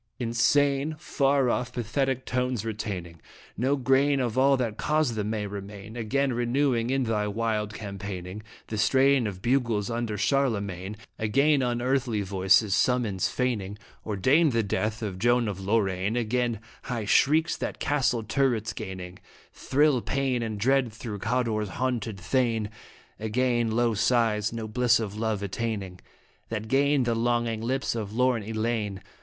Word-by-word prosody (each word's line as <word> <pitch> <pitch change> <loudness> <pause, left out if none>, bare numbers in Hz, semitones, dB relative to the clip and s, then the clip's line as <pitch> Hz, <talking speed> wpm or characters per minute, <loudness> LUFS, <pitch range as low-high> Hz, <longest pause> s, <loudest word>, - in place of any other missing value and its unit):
Insane, 140 +5 +2
far 140 -3 +1
off, 125 0 -1
pathetic 130 +2 -1
tones 125 -3 -1
retaining, 100 -7 -5 0.3
No 130 +6 +1
grain 135 +1 +2
of 120 -3 -1
all 135 +1 +4
that 115 -4 -2
caused 150 -1 +1
them 105 -1 -2
may 110 -2 -2
remain; 100 +2 -8
Again 130 +4 0
renewing 120 0 +1
in 135 0 +1
thy 105 -3 0
wild 105 0 -1
campaigning 100 -2 -6 0.2
The 110 - -4
strain 135 +1 +4
of 95 -2 -7
bugles 120 -4 +1
under 115 -2 -2
Charlemagne; 100 -5 -1 0.2
Again 135 +7 +3
unearthly 120 -2 0
voices, 95 +2 +3
summons 105 -4 +1
feigning, 105 -6 -2 0.3
Ordain 130 - +3
the 115 -3 +1
death 110 +2 -2
of 95 -3 -4
Joan 120 +1 +3
of 100 -2 -4
Lorraine; 100 0 0
Again 120 -1 0 0.2
high 120 -5 -3
shrieks 155 +9 +3
that - - -4
castle 130 -6 +1
turrets 120 -3 0
gaining 95 -3 -7 0.3
Thrill 140 -2 +2
pain 135 -2 -1
and 110 -2 -3
dread 130 +1 +2
through 110 -2 -7
Cawdor's 110 -2 -1
haunted 115 -3 -2
Thane; 115 0 0 0.5
Again 120 +1 +1
low 115 +1 +2
sighs 110 -1 +2
(no 115 -1 -5
bliss 120 +2 +3
of 105 -3 -4
love 110 -2 -1
attaining) 100 -3 -3 0.5
That 110 -1 -4
gain 140 +1 +3
the 120 -1 +1
longing 115 -1 0
lips 130 +4 -1
of 110 -3 -4
lorn 125 0 +2
Elayne. 110 -2 -2
115 Hz, 145 wpm, -27 LUFS, 105-130 Hz, 0.5 s, all